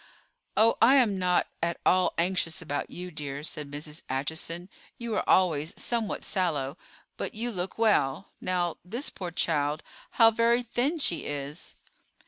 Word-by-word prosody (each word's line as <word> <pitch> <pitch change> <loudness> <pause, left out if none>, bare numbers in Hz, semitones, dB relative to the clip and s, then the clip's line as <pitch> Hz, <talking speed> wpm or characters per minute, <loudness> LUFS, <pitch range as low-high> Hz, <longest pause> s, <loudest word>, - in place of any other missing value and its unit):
"Oh, 225 +1 +5
I 255 +4 +7
am 220 -8 +4
not 180 -1 +3 0.2
at 170 0 -1
all 185 0 +4
anxious 170 -1 0
about 145 -3 -3
you, 180 +1 -7
dear," 145 -2 -5
said 150 -2 -4
Mrs. 150 +2 -5
Acheson. 160 +6 -3 0.3
"You 235 -2 -4
are - - -1
always 160 -4 +3
somewhat 230 -3 -1
sallow, 150 -7 0 0.4
but - - -4
you 235 +3 -1
look 185 -2 -4
well. 195 -8 +2
Now, 175 -2 0
this 235 - -4
poor 180 -2 -5
child—how 160 - +1
very 235 +2 +3
thin 250 +7 0
she 225 - +1
is!" 145 +2 -5
180 Hz, 145 wpm, -28 LUFS, 150-220 Hz, 0.4 s, I